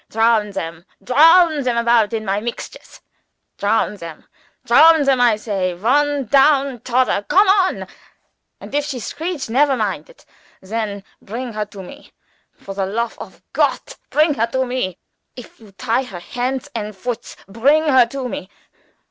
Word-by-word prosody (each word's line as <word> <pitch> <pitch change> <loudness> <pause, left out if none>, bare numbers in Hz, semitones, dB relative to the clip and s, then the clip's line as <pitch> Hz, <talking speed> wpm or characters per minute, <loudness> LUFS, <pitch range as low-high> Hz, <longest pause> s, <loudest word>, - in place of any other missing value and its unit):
Drown 225 -1 +2
them 165 -3 -6 0.2
turn 315 +2 +5
turn 245 -2 -1
about 235 -2 +3
in 220 -1 -3
my 195 +1 0
mixtures. 235 +2 -8 0.6
Drown 205 0 0
them, 165 -4 -10 0.4
I 275 -8 +5
say, 195 -4 -3
one 280 +7 +1
down 275 0 +3
todder 245 -4 0
come 395 +2 +5
on, 385 -1 +2 0.7
and - - -12
if 290 0 +1
she 275 -4 -5
screech 315 - -5
never 270 +3 +2
mind 195 -9 -3
it. - - -20 0.3
Then 205 0 -4 0.2
bring 235 +3 -6
her 210 0 -3
to 200 -2 -11
me. 280 +10 -14 0.4
For 195 - -9
the 195 -1 -2
lofe 230 +4 -3
of - - -11
Gott, - - -1
bring 305 0 +3
her 230 -3 0
to 260 +2 -1
me. 245 -8 -3 0.4
If 245 - -13
you 215 -3 -16
tie 235 +4 -1
her 190 -7 -9
hands 255 +8 -4
and 210 -3 -5
foots, 245 +3 -5
bring 270 +10 +2
her 260 -6 +4
to 265 +1 -5
me. 190 -4 -7
235 Hz, 155 wpm, -19 LUFS, 210-275 Hz, 0.7 s, turn